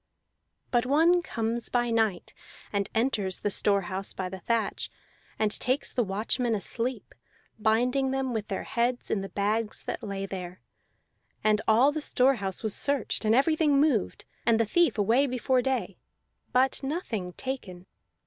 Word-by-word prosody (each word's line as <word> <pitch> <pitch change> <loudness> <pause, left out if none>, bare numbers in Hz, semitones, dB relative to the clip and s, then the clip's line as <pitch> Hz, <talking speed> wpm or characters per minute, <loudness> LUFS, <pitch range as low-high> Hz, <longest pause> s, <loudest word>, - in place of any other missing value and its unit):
But 240 0 +2
one 330 +6 +4
comes 230 -5 -1
by 240 -1 +1
night, 220 -5 0 0.4
and 200 0 0
enters 220 -6 0
the 205 - 0
store 200 0 +2
house 190 +2 -3
by 185 -1 -3
the 190 0 -7
thatch, 230 +5 -1 0.5
and 215 -1 +1
takes 255 +6 0
the 245 - +1
watchmen 225 +4 0
asleep, 230 +3 -4 0.5
binding 250 +5 +2
them 265 -1 -1
with 215 -2 -3
their 195 - -3
heads 240 +1 -1
in 195 - 0
the 195 - -6
bags 210 +2 -1
that - - -4
lay 195 -1 -4
there. 185 -2 -7 0.8
And 215 0 +3
all 240 +6 +5
the 310 +1 -3
store 265 -2 +3
house 195 -1 -3
was 215 -2 +1
searched 280 -5 +1
and 215 +1 +4
everything 295 +1 +3
moved, 280 -9 +1 0.2
and 230 -1 +3
the 230 - +3
thief 340 +6 +2
away 230 +7 +3
before 255 0 +1
day, 240 -8 -2 0.5
but 260 +1 +2
nothing 255 - -3
taken. 190 -9 -6
230 Hz, 160 wpm, -28 LUFS, 200-260 Hz, 0.8 s, all